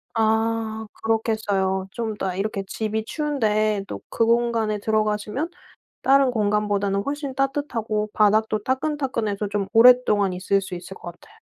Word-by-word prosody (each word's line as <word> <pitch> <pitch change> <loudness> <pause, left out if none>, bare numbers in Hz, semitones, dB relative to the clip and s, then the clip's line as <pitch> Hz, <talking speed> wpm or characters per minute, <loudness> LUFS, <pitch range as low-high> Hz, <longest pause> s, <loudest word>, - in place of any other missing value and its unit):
아 220 0 0 0.2
그렇겠어요. 205 -4 0
좀 225 -2 -3
이따 190 -3 -3
이렇게 195 0 -2
집이 220 +1 -3
추운데 215 -9 0
또 - - -6
그 230 - +1
공간에 230 -2 +1
들어가시면 215 +7 -1 0.5
다른 270 -1 +4
공간보다는 205 -2 0
훨씬 285 -1 -4
따뜻하고 245 -6 -1
바닥도 215 0 +2
따끈따끈해서 260 -7 -1
좀 200 -2 -2
오랫동안 225 -5 +5
있을 195 +2 +1
수 185 - -6
있을 180 +2 -9
것 175 - -8
같아요. 430 - -21
220 Hz, 330 characters per minute, -23 LUFS, 205-235 Hz, 0.5 s, 오랫동안